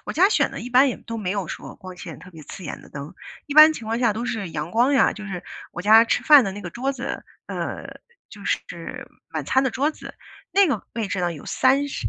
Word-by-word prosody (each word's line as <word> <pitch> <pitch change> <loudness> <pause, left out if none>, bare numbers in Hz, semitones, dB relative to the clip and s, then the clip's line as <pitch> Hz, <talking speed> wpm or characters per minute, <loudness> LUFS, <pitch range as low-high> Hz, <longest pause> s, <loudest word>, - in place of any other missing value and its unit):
我 - - -4
家 375 +5 +5
选 - - +2
的 - - -7
一 245 - -6
般 255 +3 +6
也 250 - -3
都 230 -1 -7
没 190 -4 -3
有 200 -4 -2
说 - - -7
光 185 -1 -11
线 165 -5 -9
特 180 +3 -14
别 160 -3 -12
刺 165 +5 -10
眼 - - -6
的 - - -15
灯， 140 +2 -8 0.3
一 285 - -5
般 310 +1 +9
情 235 -8 -8
况 225 +1 -1
下 235 -4 +2
都 230 +3 -4
是 200 -6 -3
阳 155 +1 -4
光 240 +7 +3
呀， 275 - +4
就 210 - -9
是 180 -3 -5 0.3
我 175 - -6
家 220 +3 +7
吃 - - 0
饭 295 -4 +7
的 195 - -3
那 205 - -8
个 180 - -6
桌 260 +8 -2
子， 265 0 -5 0.2
呃， - - -5 0.4
就 - - -13
是 - - -4 0.2
晚 - - -4
餐 265 - +2
的 260 - +1
桌 280 +6 0
子， - - -11 0.4
那 400 0 +5
个 260 - -2
位 220 -4 -2
置 185 - -2
呢， 175 -1 0
有 150 - -10
3 270 +2 +2
是 - - -3
225 Hz, 275 characters per minute, -23 LUFS, 185-270 Hz, 0.4 s, 般